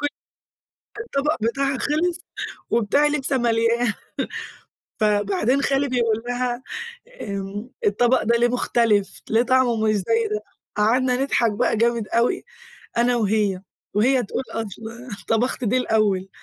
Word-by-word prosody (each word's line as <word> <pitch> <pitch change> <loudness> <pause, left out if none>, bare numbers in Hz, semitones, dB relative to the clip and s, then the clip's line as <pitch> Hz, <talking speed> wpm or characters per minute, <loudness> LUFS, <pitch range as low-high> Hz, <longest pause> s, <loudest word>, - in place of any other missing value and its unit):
ك 290 - +1 0.9
كان 430 - -5
الطبق 295 -3 0
بتاعها 270 +4 0
خلص، 335 +4 0 0.5
وبتاعي 235 +7 +3
لسه 280 -2 0
ماليا 230 -1 +2 1.1
فبعدين 210 +5 +2
خالي 275 +1 +1
بيقول 230 -3 +1
لها: 245 0 -2 0.6
"آمم، 200 +3 -5 0.2
الطبق 240 +5 +3
ده 235 +2 +2
ليه 240 +1 +4
مختلف؟ 230 -4 +1
ليه 225 +2 +4
طعمه 255 -2 +3
مش 215 - +3
زي 445 - +1
ده؟"، 425 - -2 0.3
قعدنا 250 +4 +3
نضحك 235 -5 +2
بقى 205 - +1
جامد 230 -2 +1
أوي 235 +1 +1 0.5
أنا 240 +1 +3
وهي، 210 -4 +1 0.3
وهي 245 +4 +3
تقول 240 - -3
أصل 225 -1 -5 0.4
طبخت 245 +3 0
دي 240 +4 +2
الأوّل، 205 -6 +1
235 Hz, 130 wpm, -23 LUFS, 215-260 Hz, 1.1 s, ليه